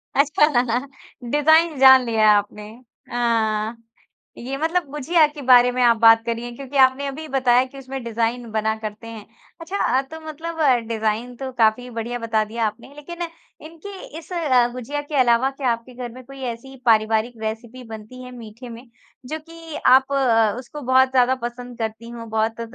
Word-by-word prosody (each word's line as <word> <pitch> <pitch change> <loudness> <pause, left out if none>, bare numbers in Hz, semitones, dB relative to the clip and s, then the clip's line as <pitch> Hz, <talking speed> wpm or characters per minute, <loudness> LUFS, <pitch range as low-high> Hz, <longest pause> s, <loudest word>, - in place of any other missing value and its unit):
अच्छा 295 +2 +4 0.9
डिज़ाइन 315 +2 +4
जान 265 -1 +8
लिया 220 -2 +3
है 210 - +7
आपने। 210 +1 -5 0.4
अ, 225 -2 0 0.6
ये 265 +3 -5
मतलब 325 +4 0
गुजिया 310 +3 +3
के 295 0 -11
बारे 250 -1 +6
में 255 - -2
आप 235 -1 +4
बात 225 0 +6
करिए 235 +1 -4
क्योंकि 275 +2 -6
आपने 265 +1 +4
अभी 310 +3 -6
बताया 255 -2 +3
कि 265 +1 -14
उसमें 270 -1 -7
डिज़ाइन 235 +1 -2
बना 220 0 0
करते 215 +1 -7
हैं। 225 -2 -9 0.4
अच्छा 370 +5 -5 0.2
अ, - - +2
तो 315 +4 -11
मतलब 325 +2 -7 0.3
डिज़ाइन 225 +2 -2
तो 265 +1 -6
काफ़ी 225 +3 +2
बढ़िया 235 +1 -5
बता 225 -2 0
दिया 225 +1 -2
आपने। 225 +6 -9
लेकिन 340 +4 -9 0.4
इनकी 330 +5 -11 0.3
इस 335 - -17
अ, 260 -8 +2
गुजिया 255 +4 -4
के 290 +1 -7
अलावा 245 +1 +3
क्या 270 -2 -1
आपके 235 +2 -6
घर 245 -1 -6
में 255 +2 -12
कोई 275 0 -12
ऐसी 265 +4 -13
पारिवारिक 220 +1 +2
रेसिपी 225 +3 -6
बनती 220 +3 -10
है 250 - -10
मीठे 230 +2 -11
में 235 +2 -11 0.4
जो 310 +5 -5
कि 330 0 -11
आप 265 +2 +5
अ, 225 -6 +3
उसको 280 +4 -10
बहुत 260 0 +3
ज़्यादा 255 0 +3
पसंद 245 0 -7
करती 225 +1 -5
हों 230 -1 -9
बहुत 220 +1 -1
245 Hz, 175 wpm, -21 LUFS, 230-275 Hz, 0.9 s, जान